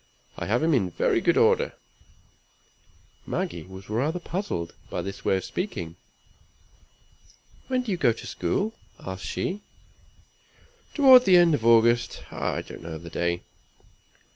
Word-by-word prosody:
I - - -5
have 120 +8 +1
him 165 0 +3
in 100 -9 +2
very - - +1
good - - +2
order." - - +3 1.5
Maggie 85 -1 -3
was 95 +3 -12
rather 135 +11 -1
puzzled 175 - -4 0.2
by - - -3
this 100 0 -7
way 95 - +2
of 95 - -5
speaking. 85 - -4 1.7
"When 255 -1 0
do 230 - -4
you 185 - 0
go 120 - +3
to 115 - -8
school?" 215 +3 -1 0.3
asked 95 0 -7
she. 195 +3 -3 1.3
"Toward 260 -4 +8
the 185 -2 +7
end 175 -2 +5
of 120 - 0
August; 115 +1 +4
I - - -2
don't - - -11
know 80 -1 -6
the 85 +1 -11
day." 85 0 -1
120 Hz, 140 wpm, -26 LUFS, -, 1.7 s, Toward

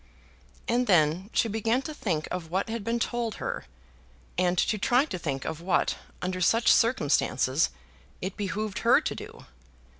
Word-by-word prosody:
And 245 +1 +1
then 175 +1 +3
she - - +2
began 225 +4 0
to 310 - -5
think 170 - -2
of 170 -3 -4
what 190 +6 -1
had 225 -1 -3
been 230 +2 0
told 235 -1 -2
her; - - -4 0.7
and 180 0 +1
to 215 +3 +1
try 250 +7 +3
to 185 - -5
think 135 -5 -3
of 160 - -4
what, 175 0 +1 0.3
under 185 0 -2
such 225 +5 +5
circumstances, 150 - +2 0.5
it 190 +1 -4
behoved 205 0 -3
her - - +5
to - - -3
do. - - -10
195 Hz, 160 wpm, -27 LUFS, 175-230 Hz, 0.7 s, such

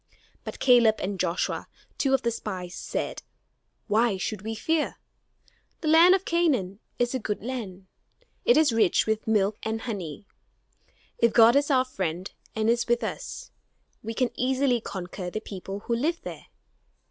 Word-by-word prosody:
But - - -7
Caleb 240 -4 +5
and 195 0 -4
Joshua, 175 -1 -1 0.3
two 270 -1 +3
of 265 - -2
the 235 - +1
spies, 185 -5 -5
said, - - -4 0.6
"Why 220 -1 +2
should 200 +1 -3
we 220 +2 -4
fear? 320 +7 0 0.9
The 315 - 0
land 335 +4 +7
of 385 0 -3
Canaan 260 - +1 0.2
is 245 +1 0
a 260 - -1
good 210 -3 -4
land; 215 -7 -5 0.6
it 480 - +5
is 310 -6 +4
rich 225 -6 +3
with 220 0 -1
milk 210 -1 +2
and 220 0 -3
honey. 200 -6 -5 0.9
If 235 -1 +3
God 230 +1 +7
is 285 +1 +3
our 260 -2 +3
friend 185 -6 -4 0.2
and 220 0 0
is 235 +1 +2
with 240 +1 +1
us, - - -6 0.5
we 225 +1 -5
can 255 -1 +1
easily 255 -1 +1
conquer 180 -2 -6
the 215 - -4
people 195 -1 -7
who 235 - -1
live 320 +8 0
there. - - -8
225 Hz, 160 wpm, -26 LUFS, 200-260 Hz, 0.9 s, land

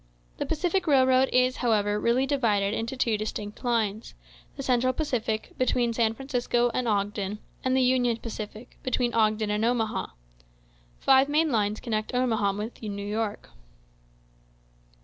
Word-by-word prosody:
The - - -3
Pacific 350 +3 0
Railroad 260 -2 +4
is, 255 0 +3
however, 210 -3 +1
really 240 +4 +2
divided 215 -8 +1
into 230 +4 -3
two 225 -4 +1
distinct 210 0 -5
lines: 225 -3 -1 0.4
the 275 - -6
Central 255 0 +2
Pacific, 235 -8 -2
between 245 -2 +1
San 225 -1 +1
Francisco 245 -2 0
and 250 0 -1
Ogden, 205 -1 -1 0.3
and 260 0 +2
the 260 - +4
Union 250 -2 +2
Pacific, 220 0 -8
between 250 -1 0
Ogden 215 -1 +2
and 210 +1 0
Omaha. 230 -2 0 0.9
Five 270 +1 +4
main 310 +1 +2
lines 210 -2 0
connect 220 0 -3
Omaha 225 -5 +1
with 210 +4 -6
New 200 -2 -5
York. 210 0 -3
235 Hz, 140 wpm, -27 LUFS, 215-255 Hz, 0.9 s, Railroad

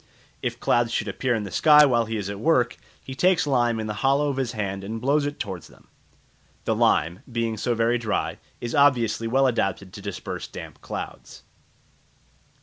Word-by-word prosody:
If - - -3
clouds 120 -1 +2
should 110 - -1
appear 120 +5 0
in 110 - -2
the 100 - -7
sky 150 -1 +7
while 120 -4 +2
he 110 0 -3
is 100 -2 -3
at 100 0 -5
work, 125 -4 +2 0.3
he 130 - -7
takes 180 +4 +3
lime 120 -5 +1
in 110 - -3
the 105 - -3
hollow 140 +2 +3
of 135 - -3
his 125 -3 -1
hand 100 -3 -3
and 110 +3 -5
blows 140 +4 +2
it 145 - -6
towards 95 -3 -5
them. - - -21 0.8
The - - +1
lime, 85 +4 +2
being 115 -1 -1
so 120 +3 -1
very 115 +2 +2
dry, 110 -2 -2 0.2
is 120 -1 -5
obviously 120 -5 +3
well 135 +4 +3
adapted 100 -6 -1
to 105 - -9
disperse 100 -3 -5
the - - -27
damp - - -9
clouds. - - -7
115 Hz, 195 wpm, -24 LUFS, 105-135 Hz, 0.8 s, sky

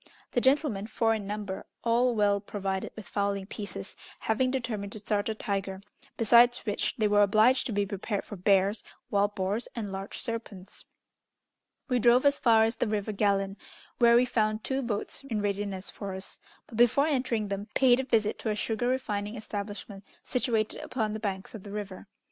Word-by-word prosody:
The 245 - +1
gentlemen, 260 -6 +2
four 225 0 +1
in 210 -3 -4
number, 205 -2 -5 0.2
all 240 +1 +3
well 205 -1 +3
provided 195 -1 -3
with 220 -5 -9
fowling 200 +1 -1
pieces, 200 -1 -7 0.3
having 240 +4 +1
determined 230 -6 -3
to - - -5
start 205 0 -1
a 220 - -2
tiger, 195 -3 -3 0.4
besides 240 +2 +5
which 205 -2 -1
they 215 -2 +2
were 205 0 +4
obliged 215 +6 +4
to - - -4
be 205 -1 +1
prepared 200 +1 -3
for 205 - -7
bears, 195 +2 +2 0.3
wild 205 0 +2
boars, 200 +4 -1
and 215 -4 -4
large 195 +1 -6
serpents. 225 -5 -6 1.0
We 250 -3 +1
drove 245 +3 +5
as 285 0 +4
far 225 -2 +5
as 225 +1 0
the - - 0
river 210 0 -1
Gallon, 200 -1 +1 0.4
where 235 -1 +6
we 245 +1 +5
found 215 -2 0
two 265 0 -1
boats 230 +1 -3
in 225 -6 -2
readiness 200 -2 -2
for 195 -2 -6
us, 190 +1 -8 0.3
but, 225 - -10
before 240 +4 +5
entering 250 -8 0
them, 200 +1 -4
paid 255 -2 +5
a - - 0
visit 225 -5 +1
to 225 - -2
a 210 - 0
sugar 225 +3 -1
refining 215 -4 -2
establishment 205 -2 -6 0.2
situated 230 -4 0
upon 220 -4 -2
the 215 - -4
banks 195 -3 -4
of 220 - -7
the 200 - -10
river. 205 -1 -6
215 Hz, 185 wpm, -29 LUFS, 200-235 Hz, 1.0 s, where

